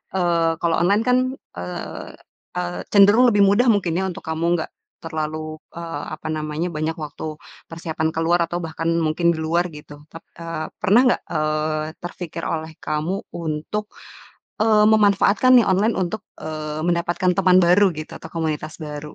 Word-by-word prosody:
eee, 170 -3 +2
kalau 170 -1 +2
online 200 +5 +3
kan, 250 0 +4 0.4
eee, 90 0 -6 0.5
eee, 175 0 -3
cenderung 205 +5 +7
lebih 205 -3 +4
mudah 205 +6 +3
mungkin 200 -6 +2
ya 190 - 0
untuk 180 - -8
kamu, 160 +1 -2
nggak 160 - -5 0.3
terlalu, 155 -1 -4 0.2
eee, 165 -3 -5
apa - - -8
namanya, 155 +2 -2
banyak 155 +1 -2
waktu 155 0 -6 0.3
persiapan 160 -1 -2
keluar 165 +2 +2
atau 175 +1 -4
bahkan 165 +1 -3
mungkin 160 +2 +1
di - - -6
luar 170 +2 +1
gitu 145 -1 -12
tap 165 - -11 0.2
eee, 165 -1 -4
pernah 215 +6 +5
nggak, 245 - +2
eee, 155 0 0 0.2
terpikir 175 -1 -6
oleh 160 0 -3
kamu 155 +5 -2 0.2
untuk, 170 +5 -3 0.8
eee, 215 -1 +5
memanfaatkan 210 +3 +4
nih 235 - +3
online 205 +5 +2
untuk, 190 +3 -2 0.2
eee, 155 -1 -5
mendapatkan 175 +1 +1
teman 185 -1 +5
baru 180 +4 +5
gitu 155 0 -7
atau - - -10
komunitas 155 -2 -2
baru. 150 0 -7
165 Hz, 155 wpm, -22 LUFS, 155-185 Hz, 0.8 s, cenderung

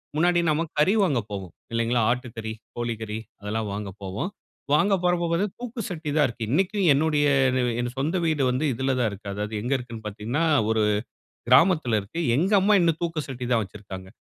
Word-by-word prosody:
முன்னாடி 175 +3 +3
நம்ம 155 +1 +2 0.2
கறி 185 +7 +4
வாங்க 145 -10 +2
போவோம் 95 -4 -5 0.2
இல்லைங்களா? 115 +1 +1
ஆட்டுக்கறி, 115 -3 -4 0.2
கோழி 120 0 -2
கறி 110 -1 -4 0.2
அதெல்லாம் 105 +2 -2
வாங்க 100 0 -4
போவோம். 100 - -3 0.4
வாங்க 175 +7 +4
போகறப்போ 175 -1 +2
பார்த்த 175 +5 +1
தூக்கு 245 -1 -5
சட்டி 165 -4 -5
தான் 150 -2 +5
இருக்கு. 115 -2 -5
இன்னைக்கு 190 +7 +1
என்னுடைய 145 0 +2 0.7
சொந்த 155 +7 0
வீடு 155 -4 +1
வந்து. 130 +5 0
இதுல 130 +3 0
தான் 120 -3 +2
இருக்கு. 100 +1 -10
அதாவது 105 +1 -4
எங்க 120 +5 -3
இருக்குன்னு 120 -3 -8
பார்த்தீங்கன்னா 110 +9 -2 0.3
ஒரு 110 -1 +2 0.7
கிராமத்துல 140 - +5
இருக்கு. 105 +12 -6 0.2
எங்க 180 +8 +1
அம்மா 205 +2 +4
இன்னும் 165 -2 +3
தூக்கு 165 -2 -1
சட்டி 130 -2 -5
தான் 115 - +3
வச்சுருக்காங்க. 95 -2 -9
130 Hz, 175 wpm, -25 LUFS, 110-165 Hz, 0.7 s, தான்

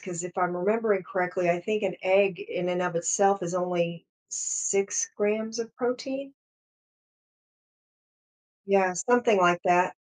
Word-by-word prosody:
'cause 180 -2 -6
if 180 +1 -9
I'm 180 -1 0
remembering 205 +1 +1
correctly, 180 -1 -1
I 175 +1 +2
think 215 +4 -2
an 185 -2 -2
egg 190 0 +3
in 180 -3 -4
and 180 0 -1
of 180 -1 -2
itself 195 +4 +2
is 175 +1 -4
only 175 -1 -2 0.2
6 200 - -1
grams 220 +2 -1
of 230 -1 -7
protein. 265 +2 -4 2.3
Yeah, 195 -2 +3
something 235 +4 +3
like 175 -1 +4
that. 180 0 +3
190 Hz, 135 wpm, -27 LUFS, 180-215 Hz, 2.3 s, like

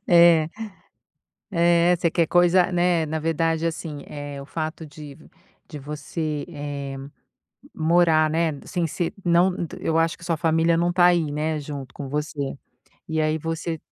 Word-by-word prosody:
É. 170 -2 +6 1.0
É, 170 0 +4
você 170 0 0
quer 165 -1 +2
coisa 175 +1 +4
né, 175 -2 +2
na 160 +1 -2
verdade 165 +1 0
assim, 160 -3 -4
eh, 145 -1 -7
o 140 - -8
fato 160 +1 -5
de 145 -1 -11 0.5
de 150 - -8
você, 150 +1 -4
eh, 145 -4 -6 0.8
morar, 160 -1 +3
né, 165 0 +1
sem 175 - -2
ser 170 +2 -2
não 175 +2 +3 0.2
eu 160 - -1
acho 165 0 +1
que 170 - -13
sua 170 -2 0
família 165 +1 +2
não 175 +1 +1
tá 175 0 +4
aí, 170 -4 +3
né, 155 +1 -1
junto 140 -3 -7
com 140 - -6
você. 145 -1 -3 0.5
E 160 -1 -1
aí, 155 0 +1
você 165 0 -4
160 Hz, 155 wpm, -24 LUFS, 150-170 Hz, 1.0 s, É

